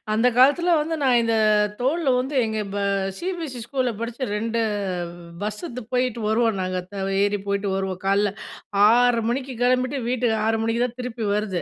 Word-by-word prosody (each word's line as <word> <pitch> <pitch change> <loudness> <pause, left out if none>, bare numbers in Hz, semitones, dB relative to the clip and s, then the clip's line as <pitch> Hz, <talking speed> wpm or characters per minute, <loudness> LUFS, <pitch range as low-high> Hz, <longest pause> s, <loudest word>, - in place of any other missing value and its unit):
அந்த 225 +3 +3
காலத்துல 290 +7 +5
வந்து 320 +2 -1
நான் 250 -3 +4
இந்த 230 0 +1 0.4
தோள்ல 280 +4 +1
வந்து 270 +3 -3
எங்க 220 0 -3 0.2
ப - - -2 0.4
சிபிஎஸ்சி 335 -8 -4
ஸ்கூல்ல 255 -1 -1
படிச்சு 235 +3 -4
2 230 +1 -1 0.8
பஸ்ஸுக்கு 235 +5 -5
போயிட்டு 250 -2 0
வருவோம் 225 -2 +1
நாங்க, 185 0 -2 0.4
ஏறி 205 0 +1
போயிட்டு 200 0 -1
வருவோம். 190 -1 -3
காலையில 200 0 +2 0.6
ஆர்ற 240 +1 +4
மணிக்கு 260 +1 -2
கிளம்பிட்டு 255 +2 +1
வீட்டுக்கு 245 -2 +1
6 225 0 +1
மணிக்கு 230 +1 +1
தான் 245 0 -7
திருப்பி 245 -2 -4
வருது. 195 -5 -1
240 Hz, 155 wpm, -23 LUFS, 220-255 Hz, 0.8 s, காலத்துல